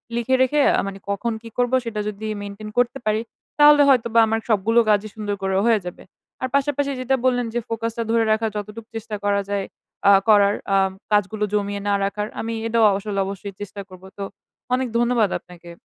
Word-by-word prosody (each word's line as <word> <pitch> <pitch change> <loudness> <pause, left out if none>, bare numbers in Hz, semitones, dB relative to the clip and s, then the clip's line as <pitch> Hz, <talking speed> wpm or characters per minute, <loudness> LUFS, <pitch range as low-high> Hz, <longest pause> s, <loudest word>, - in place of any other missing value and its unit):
লিখে 240 +2 +1
রেখে 260 +3 +2 0.2
আ - - +2
মানি 195 0 -7
কখন 215 +4 -1
কি 230 - -10
করব, 245 0 +1
সেটা 225 -2 -4
যদি 210 +1 -5 0.2
মেইনটেইন 205 +1 -7
করতে 245 +2 +2
পারি, 215 0 +1 0.4
তাহলে 295 0 +8
হয়তোবা 235 -3 +3
আমার 225 0 0
সবগুলো 220 +2 +3
কাজই 210 0 +2
সুন্দর 210 -2 -3
করে 190 0 0
হয়ে 230 -2 +4
যাবে। 180 - -8 0.4
আর 255 - 0
পাশাপাশি 280 0 +1
যেটা 255 +1 +1
বললেন, 245 -1 +2
যে 240 - 0
ফোকাস 230 0 -2
টা 230 - 0
ধরে 230 0 +3
রাখার 220 +1 +1
যতটুকু 210 +2 -7
চেষ্টা 220 -1 -5
করা 200 0 +2
যায়, 200 -1 -1 0.4
আ - - +8 0.2
করার 205 -1 +6 0.2
আ - - +5 0.3
কাজগুলো 210 +1 +1
জমিয়ে 205 -1 -1
না 205 - +2
রাখার। 210 +1 -3
আমি 230 +1 -3
এটাও 230 0 +2
আসলে 200 0 -3
অবশ্যই 200 +1 -6
চেষ্টা 205 0 -6
করব। 185 0 -14
তো 200 - -4 0.5
অনেক 255 0 +1
ধন্যবাদ 235 -3 +2
আপনাকে। 175 -1 -14
215 Hz, 195 wpm, -22 LUFS, 200-235 Hz, 0.5 s, তাহলে